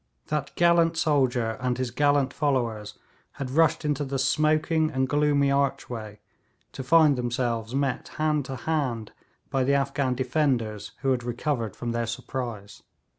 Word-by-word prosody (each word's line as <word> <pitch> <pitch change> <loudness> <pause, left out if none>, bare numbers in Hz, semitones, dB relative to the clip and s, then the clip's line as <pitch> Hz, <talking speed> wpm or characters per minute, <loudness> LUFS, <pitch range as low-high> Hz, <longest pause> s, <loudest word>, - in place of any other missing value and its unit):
That 150 -2 -2
gallant 170 -1 +3
soldier 130 -8 +1
and 125 -1 0
his 130 -2 -2
gallant 145 0 +2
followers 120 -8 -1 0.4
had 130 -2 -5
rushed 160 +2 +2
into 150 -1 0
the 135 -1 -3
smoking 155 +3 +2
and 130 -3 0
gloomy 145 -1 +2
archway 120 -6 -2 0.5
to 130 - -6
find 155 +1 +5
themselves 120 -1 -2
met 135 -2 -1
hand 150 -2 +1
to 130 - -5
hand 130 -7 -2 0.4
by 135 -2 +1
the 140 +2 +2
Afghan 140 -1 0
defenders, 125 -5 -1
who 135 - +2
had 125 -2 0
recovered 120 -3 -2
from 120 -1 -4
their 115 0 -1
surprise. 115 -3 -6
135 Hz, 145 wpm, -26 LUFS, 120-150 Hz, 0.5 s, find